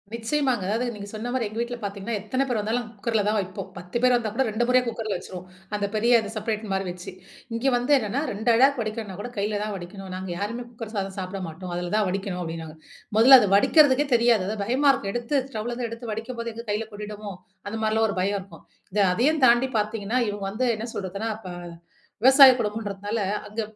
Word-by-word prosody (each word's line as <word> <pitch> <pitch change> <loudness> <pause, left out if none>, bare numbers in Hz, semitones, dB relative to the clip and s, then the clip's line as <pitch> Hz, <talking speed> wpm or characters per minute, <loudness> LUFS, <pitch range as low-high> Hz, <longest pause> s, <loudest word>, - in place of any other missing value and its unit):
நிச்சயமாங்க. 240 0 0
அதாவது, 230 +4 0
நீங்க 205 -2 -8
சொன்ன 220 +2 -5
மாரி 255 -3 0
எங்க 215 +2 -6
வீட்ல 240 +1 -3
பாத்தீங்கன்னா, 200 +3 -3
எத்தன 255 +7 -1
பேர் 245 -4 0
வந்தாலும் 225 +3 -1
குக்கர்ல 215 +1 0
தான் 215 +1 +2
வைப்போம். 190 0 -5
10 180 +6 -5
பேர் 250 0 +5
வந்தா 235 -3 0
கூட 265 - +3
2 220 +3 0
முறையா 250 0 +4
குக்கர்ல 225 -3 -3
வச்சுருவோம். 180 -1 -9 0.3
அந்த 205 -1 -1
பெரிய 235 +2 +5
இது 205 - -6
செப்ரேட் 215 0 -2
மாரி 195 0 0
வச்சு. 180 0 -7 0.4
இங்கே 245 +4 +1
வந்து 245 +4 +1
என்னான்னா 245 +3 -1
2 220 +4 +1
ஆழாக்கு 265 +2 +4
வடிக்கணும்னா 215 -3 -5
கூட, 245 - -5
கையில 205 +1 -1
தான் 210 0 -3
வடிக்கணும். 190 +1 -8
நாங்க 185 0 -5
யாருமே 230 +5 -4
குக்கர் 225 -1 -8
சாதம் 195 -1 -3
சாப்பிட 190 +1 -5
மாட்டோம். 175 +3 -7
அதுல 175 +1 -3
தான் 210 -2 +2
வடிக்கணும் 190 -1 -3
அப்டின்னாங்க. 165 -1 -6 0.4
மொதல்ல 260 +4 +10
அத 205 - +1
வடிக்கிறதுக்கே 290 +5 +5
தெரியாது. 230 -4 +3
அதா 215 - -3
பயமா 265 +6 +3
இருக்கும். 195 -6 -3
எடுத்து 240 +4 -1
ஸ்டவ்லேந்து 240 +1 -3
எடுத்து 230 0 -6
வடிக்கும்போது, 235 +1 -5
எங்க 230 +1 -7
கையில 215 +1 -2
கொட்டிடுமோ? 210 0 -7 0.3
அந்த 215 +2 -4
மாரிலாம் 220 +1 +2
ஒரு 200 - -4
பயம் 200 +1 0
இருக்கும். 195 - -15 0.3
இத 210 - 0
அதையும் 290 +9 +2
தாண்டி 240 +2 +4
பாத்தீங்கன்னா, 215 +2 -1
இவுங்க 205 -1 -4
வந்து 250 +5 0
என்ன 220 - -4
சொல்றதுன்னா, 200 +3 -3
அப்ப 220 -4 -12 0.8
விவசாய 265 +1 +9
குடும்பம்ன்றதுனால 210 -1 -3 0.3
அங்க 210 +2 -4
215 Hz, 200 wpm, -25 LUFS, 200-240 Hz, 0.8 s, மொதல்ல